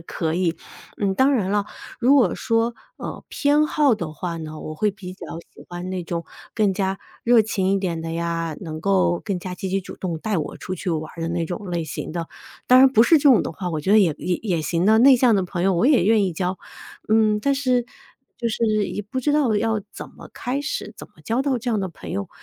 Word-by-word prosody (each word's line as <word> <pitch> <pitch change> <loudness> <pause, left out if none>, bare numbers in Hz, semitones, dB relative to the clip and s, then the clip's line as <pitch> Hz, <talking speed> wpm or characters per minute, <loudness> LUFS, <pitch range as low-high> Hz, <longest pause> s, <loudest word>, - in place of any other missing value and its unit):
可 165 -1 -3
以。 175 -1 0 0.4
嗯， 195 -2 0
当 265 +4 +4
然 200 -7 0
了， 205 0 +1 0.3
如 255 +4 +5
果 240 -11 +4
说， 230 0 0 0.2
呃， - - -7
偏 295 +1 +2
好 295 -5 +3
的 170 -7 -5
话 170 +1 -4
呢， 155 -1 -7
我 155 - -7
会 210 +6 +1
比 190 -2 -9
较 - - -10 0.3
喜 - - -14
欢 175 +1 -6
那 185 -1 -3
种 170 0 -4 0.3
更 210 -3 +2
加 190 0 -1 0.2
热 235 -2 +5
情 195 -3 -1
一 195 - +2
点 175 -4 -2
的 165 0 -5
呀， 165 -1 -2
能 155 -2 -6
够 185 -2 +2
更 200 -4 -2
加 180 0 -6
积 190 - -5
极 195 +1 0
主 - - -9
动 170 -4 -4
带 210 +1 -1
我 150 - -4
出 185 - -5
去 180 - -5
玩 155 -1 -3
儿 165 - -7
的 165 - -2
那 170 0 -1
种 180 +3 -6
类 170 -2 -1
型 150 - -6
的， 170 -1 -4 0.4
当 255 - +7
然 265 0 +7
不 225 -3 +5
是 315 +6 +5
这 285 - +4
种 225 - +5
的 - - -4
话， 180 +2 -5
我 155 - -2
觉 190 +7 +1
得 215 - +7
也 175 -7 +4
也 180 -1 -1
也 180 -7 0
行 170 +3 0
的， 220 +2 +5
内 265 +2 +7
向 240 -2 +4
的 190 - +1
朋 175 0 -4
友 195 - +3
我 200 +9 +2
也 285 -4 +5
愿 215 0 +4
意 185 - -1
交。 180 +2 -2 0.5
嗯， 215 -1 +3
但 280 +5 +1
是， 255 -3 +1 0.5
就 235 -1 -2
是 215 -2 +1
也 - - -4
不 260 +6 -4
知 295 - +1
道 285 -7 +2
要 220 0 0
怎 - - -8
么 - - -13
开 255 +3 -3
始， 290 - -4
怎 - - -10
么 - - -37
交 230 +3 0
到 270 -2 +1
这 240 +1 -3
样 220 - +1
的 190 - -2
朋 170 - -10
友。 100 0 -3
195 Hz, 270 characters per minute, -22 LUFS, 175-230 Hz, 0.5 s, 当